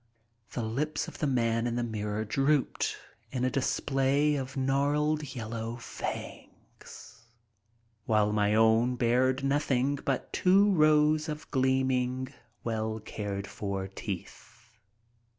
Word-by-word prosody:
The 120 - -2
lips 150 +7 -2
of - - -10
the 150 - +1
man 115 -3 +1
in 120 - -2
the 120 - 0
mirror 105 -1 -3
drooped 135 +4 +1 0.3
in 125 -1 -1
a 130 - +1
display 140 +2 +1
of 135 0 -4
gnarled, 145 +2 +1
yellow 115 0 -4
fangs, 120 0 -8 0.9
while 105 -2 +3
my 105 0 +2
own 115 +3 +4
bared 125 +3 +2
nothing 140 -1 +1
but 135 -2 -2
two 195 +3 +4
rows 155 -2 +4
of 150 0 -6
gleaming, 130 0 +1 0.3
well 110 -1 -2
cared 100 -2 -5
for 100 -1 -4
teeth. 95 -1 -8
130 Hz, 115 wpm, -29 LUFS, 110-140 Hz, 0.9 s, own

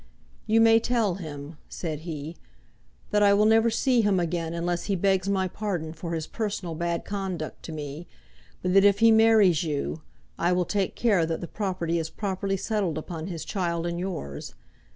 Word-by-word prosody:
"You 225 +1 +4
may 225 0 +6
tell 230 -4 +1
him," 150 -1 -8
said 155 -4 -4
he, 160 -1 -6 0.8
"that 210 - +3
I 200 -1 +6
will 210 +1 +4
never 225 +1 +5
see 245 +1 +2
him 205 -3 +2
again 170 -1 -2
unless 170 +1 -2
he 200 - 0
begs 190 +1 +1
my 190 -1 +1
pardon 180 -5 -3
for 165 +1 -5
his 160 -1 -3
personal 200 -6 -3
bad 170 +1 -2
conduct 190 -5 -4
to - - -6
me, 150 +2 -6 0.6
but 180 0 +1
that 195 0 +6
if 200 -1 +5
he 230 +1 +6
marries 220 -7 +5
you, 155 0 -3 0.4
I 175 +1 +2
will 180 0 +1
take 195 +1 -1
care 205 -8 +3
that 165 -1 -2
the 170 - -6
property 180 -5 -2
is 160 0 -3
properly 195 0 -2
settled 195 -6 -1
upon 160 +1 -5
his 165 -4 -5
child 170 -1 -2
and 170 0 -2
yours. 170 - -5
180 Hz, 185 wpm, -26 LUFS, 165-205 Hz, 0.8 s, may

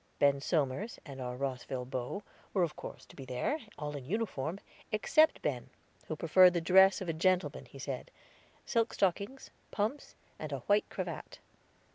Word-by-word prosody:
Ben 140 -1 +4
Somers, 155 - 0
and 135 -3 -8
our 125 0 -4
Rosville 130 -1 -3
beaux, 130 +10 -4 0.3
were 185 - +4
of 165 - -1
course - - -8
to - - -16
be 135 - -8
there, 130 - -1 0.2
all 150 0 -4
in 140 - -6
uniform, 180 - -2 0.3
except 310 +9 +4
Ben, 130 -3 -2 0.4
who 155 - -2
preferred 180 +3 +6
the - - +3
dress 190 +3 +6
of 190 - -4
a 165 - 0
gentleman, 185 +3 +1
he - - -13
said, - - -5 0.6
silk 230 -2 +1
stockings, 200 +7 0 0.2
pumps, 220 +8 -2 0.2
and 155 -1 -5
a 140 -2 -3
white 205 +1 +2
cravat. - - -5
165 Hz, 165 wpm, -32 LUFS, 135-200 Hz, 0.6 s, preferred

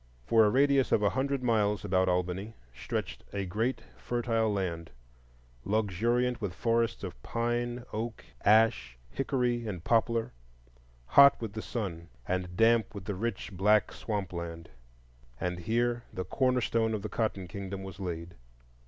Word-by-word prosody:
For 110 - +5
a - - +4
radius 135 +2 +3
of 105 - +3
a 100 - +3
hundred 135 0 -1
miles 105 -4 +1
about 95 -1 +2
Albany, 90 +4 -1 0.2
stretched 60 - -4
a 100 -1 -2
great 110 +8 -1 0.2
fertile 115 -2 0
land, 85 -5 -2 0.7
luxuriant 115 +5 +1
with 95 -4 -3
forests 115 +2 0
of - - -7
pine, 120 - -2
oak, 110 0 -4 0.2
ash, 100 - +4
hickory, 125 -4 0
and 90 -5 -5
poplar; 115 +1 +1 0.7
hot 140 - +7
with 110 -3 -5
the 110 - -4
sun 85 -9 -5 0.2
and 90 -1 -2
damp 115 -2 +3
with 100 -2 -7
the 100 - -2
rich 105 +1 -3
black 105 +2 +3
swamp 100 -5 -3
land; 85 -1 -6 0.7
and 90 -1 -2
here 120 +5 0
the 95 -3 -4
corner 130 +6 +1
stone 115 -1 +1
of 100 - -5
the - - -2
Cotton 105 -4 -2
Kingdom 100 0 -6
was 95 0 -9
laid. 85 -2 -5
105 Hz, 150 wpm, -30 LUFS, 95-115 Hz, 0.7 s, hot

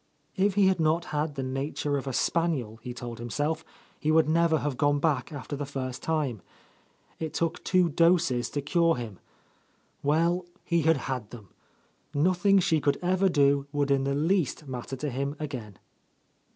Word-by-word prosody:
If 195 0 +2
he 205 -1 +5
had 190 -2 +3
not 160 +2 +2
had 150 0 -1
the 135 - -3
nature 140 +2 -2
of 140 -1 -3
a - - -1
spaniel, 135 -6 0
he 125 - -6
told 120 -1 -7
himself, 150 +7 -2 0.4
he 155 - -1
would 160 -1 +4
never 165 0 +3
have 145 -3 -2
gone 145 +1 +2
back 145 -2 0
after 145 0 -5
the 145 - -4
first 130 -2 -4
time. 145 - -1 0.8
It 160 -1 -4
took 165 -1 -1
two 185 -1 +3
doses 165 -6 +2
to 145 - -3
cure 165 +3 +3
him. 115 -6 -7 0.8
Well, 170 +5 +1 0.2
he 170 -1 +1
had 160 0 +3
had 125 -6 -3
theml 110 -6 -11 0.7
Nothing 185 +6 +3
she 165 -4 +2
could 140 0 +2
ever 185 +2 +3
do 140 -3 +3
would 145 -1 0
in 135 -1 +3
the 140 0 0
least 160 -1 0
matter 130 0 -5
to 145 +2 -3
him 140 +3 -2
again. 125 -10 -6
145 Hz, 175 wpm, -28 LUFS, 135-165 Hz, 0.8 s, he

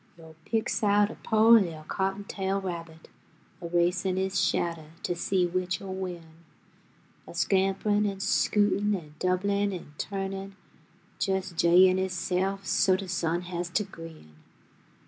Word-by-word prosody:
Yo' 160 -1 -14
picks 225 -1 -1
out 205 0 +3
a - - -9
po' 220 0 +2
li'l' 175 -9 +4
cottontail 195 0 -2
rabbit, 165 -4 -7 0.5
A 170 - -5
racin' 175 +2 +1
his 190 0 0
shadduh 165 -3 -1
to 175 - -1
see 180 +1 +1
which'll 185 +1 -2
win, 180 -3 -5 1.0
A - - -10
scamprin' 195 +3 +1
an' 195 -1 -7
scootin' 205 +1 +2
an' 155 -5 -8
doublin' 200 +2 +1
an' 175 -5 -8
turnin', 195 0 -4 0.7
Jes' 190 -2 0
'j'yin' 180 +2 +5
hisself 190 +1 -1
so 185 0 +3
de 190 0 -5
sun 170 -1 -1
has 175 -1 -4
t' 190 +4 0
grin. 165 - -12
190 Hz, 130 wpm, -28 LUFS, 175-195 Hz, 1.0 s, j'yin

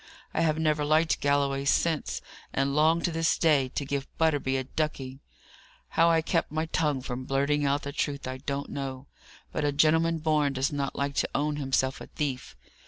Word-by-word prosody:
I - - +1
have 155 -2 +2
never 155 -2 +1
liked 155 +2 +2
Galloway 140 -1 +1
since; 155 +2 0 0.3
and 135 +1 +1
I - - -3
long, 160 +3 +3
to 175 - +1
this 165 0 +1
day, 145 -6 +3
to 140 - -1
give 140 0 -3
Butterby 145 -5 +1
a 130 - -1
ducking. 135 -2 -3 0.7
How 165 +1 +4
I 165 -1 +3
kept 165 -1 0
my 155 +1 -1
tongue 150 -4 0
from 130 0 -5
blurting 140 +2 +1
out 140 +1 +1
the 140 - -4
truth, 140 -2 -2
I 130 0 -4
don't 140 +1 -4
know: 135 -1 -5 0.5
but - - -2
a 145 - +2
gentleman 160 +3 +3
born 155 -3 +1
does 135 +1 0
not 140 -1 -2
like 140 0 -1
to - - +1
own 150 +1 0
himself 135 -1 0
a - - -8
thief. 135 -4 -4
145 Hz, 195 wpm, -28 LUFS, 135-155 Hz, 0.7 s, How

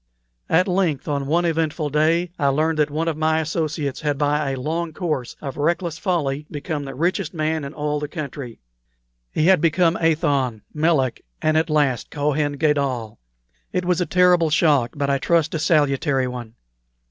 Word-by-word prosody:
"At 180 +4 +3
length, 180 -7 0
on 140 -2 -1
one 170 +4 +2
eventful 160 -2 -1
day, 165 +4 +2
I 140 - +2
learned 155 +3 +1
that 150 0 +3
one 155 +3 -2
of 165 - 0
my 160 +1 +1
associates 155 -3 -2
had 145 -2 -1
by 145 0 +1
a 135 -1 -3
long 160 +4 -2
course 155 -8 -3
of 135 -3 -6
reckless 165 +2 -1
folly 150 -5 -1
become 145 -1 -4
the 135 -1 -7
richest 175 +3 -1
man 155 0 -1
in 140 - -5
all 150 0 -1
the 150 - -4
country. 140 -5 -6 0.7
He 155 - +1
had 185 -3 +5
become 165 +1 +3
Athon, 140 -8 +1
Melek, 150 -5 +1 0.2
and 155 0 +1
at 160 +1 +2
last 145 -5 +1
Kohen 145 0 0
Gadol. 140 -7 -1 0.5
It 180 0 -1
was 180 0 +1
a 180 - 0
terrible 180 -2 +4
shock, 150 -6 +3
but 140 -1 0
I 140 - +1
trust 165 +1 +1
a 160 - -1
salutary 145 -3 +2
one. 120 -2 -7
150 Hz, 175 wpm, -22 LUFS, 140-165 Hz, 0.7 s, had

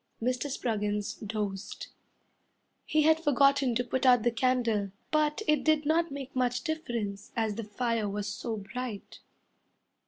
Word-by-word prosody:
Mr. 250 +4 -1
Spruggins 210 -4 -1
dozed. 205 -2 -5 1.0
He 310 0 +2
had 320 +1 +5
forgotten 275 -3 +4
to 245 - +1
put 250 +1 -2
out 250 -3 +6
the 240 - +3
candle, 230 -4 +1 0.2
But 305 +5 +1
it 300 -3 +3
did 310 -1 +3
not 330 +2 +2
make 275 -1 -7
much 250 -1 0
difference 235 -11 -3
as 220 -2 0
the 230 - -5
fire 220 0 -1
was 205 +1 -3
so 220 +2 -4
bright... 215 +1 -6
245 Hz, 145 wpm, -29 LUFS, 210-280 Hz, 1.0 s, out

